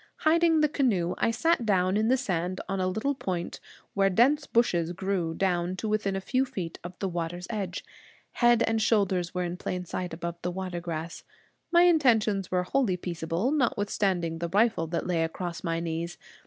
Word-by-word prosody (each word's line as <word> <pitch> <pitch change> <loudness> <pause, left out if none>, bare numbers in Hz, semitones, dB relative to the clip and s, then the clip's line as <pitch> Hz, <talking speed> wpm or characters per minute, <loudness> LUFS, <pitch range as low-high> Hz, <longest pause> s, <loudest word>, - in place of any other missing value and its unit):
Hiding 325 0 +4
the 300 - +5
canoe, 215 - +1
I - - +2
sat 325 +4 +1
down 190 -3 +2
in 215 +1 +2
the 260 +2 +4
sand 185 -7 -2
on 195 +1 -2
a 185 - +1
little 220 +9 0
point, 180 -9 -4 0.3
where 195 -1 +3
dense 275 +10 +3
bushes 175 -8 +1
grew 180 -3 -2
down 180 -1 0
to 220 - -4
within 210 -2 0
a - - -1
few 255 +6 +1
feet 195 -11 -5
of 175 +1 -8
the 195 - -2
water's 175 0 -4
edge. 195 -4 -4 0.5
Head 240 -1 +4
and 225 0 0
shoulders 190 -5 +1
were 180 - 0
in 175 0 -4
plain 180 0 -4
sight 180 +1 -4
above 170 +1 -5
the 180 - -2
water 180 -1 -4
grass. 165 -1 -5 0.5
My 345 0 +6
intentions 225 - +3
were 180 0 +1
wholly 205 -2 +1
peaceable, 170 - -2
notwithstanding 200 - 0
the 170 0 -2
rifle 205 -3 +2
that 170 +1 -2
lay 175 -2 +1
across 170 +1 -4
my 165 0 -1
knees. 170 +1 -4
185 Hz, 185 wpm, -28 LUFS, 175-225 Hz, 0.5 s, My